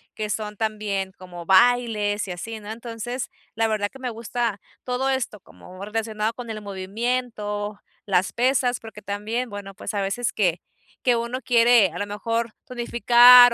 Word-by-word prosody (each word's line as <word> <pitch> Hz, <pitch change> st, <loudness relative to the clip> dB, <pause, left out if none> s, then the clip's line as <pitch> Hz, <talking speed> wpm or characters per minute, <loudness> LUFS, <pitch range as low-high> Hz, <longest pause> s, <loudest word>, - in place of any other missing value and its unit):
que 215 Hz, -1 st, -3 dB
son 210 Hz, 0 st, -3 dB
también 210 Hz, -3 st, -1 dB
como 175 Hz, -2 st, -9 dB
bailes 210 Hz, 0 st, +3 dB
y -, -, -4 dB
así, 220 Hz, +5 st, -5 dB
¿no?, 210 Hz, +1 st, -7 dB
entonces, 235 Hz, +2 st, -5 dB, 0.3 s
la 225 Hz, 0 st, +2 dB
verdad 210 Hz, -2 st, 0 dB
que 270 Hz, -, -13 dB
me 255 Hz, -1 st, -3 dB
gusta 230 Hz, -1 st, -2 dB, 0.3 s
todo 255 Hz, +2 st, 0 dB
esto 260 Hz, -5 st, -1 dB
como 185 Hz, +1 st, -12 dB
relacionado 215 Hz, +1 st, -2 dB
con 240 Hz, 0 st, -8 dB
el 215 Hz, -1 st, -5 dB
movimiento, 210 Hz, +1 st, -3 dB, 0.3 s
las 190 Hz, -3 st, +1 dB
pesas, 250 Hz, 0 st, +2 dB
porque 220 Hz, -2 st, -10 dB
también 210 Hz, +5 st, -3 dB
bueno, 200 Hz, -1 st, -7 dB
pues -, -, -5 dB
a 205 Hz, -, 0 dB
veces 195 Hz, +5 st, -1 dB
que 180 Hz, -5 st, +1 dB, 0.4 s
que 245 Hz, -2 st, +4 dB
uno 235 Hz, +2 st, -2 dB
quiere 235 Hz, -6 st, +5 dB
a -, -, -6 dB
lo 205 Hz, -, -1 dB
mejor 230 Hz, +3 st, -2 dB
tonificar 245 Hz, -1 st, +7 dB
220 Hz, 165 wpm, -24 LUFS, 205-240 Hz, 0.4 s, tonificar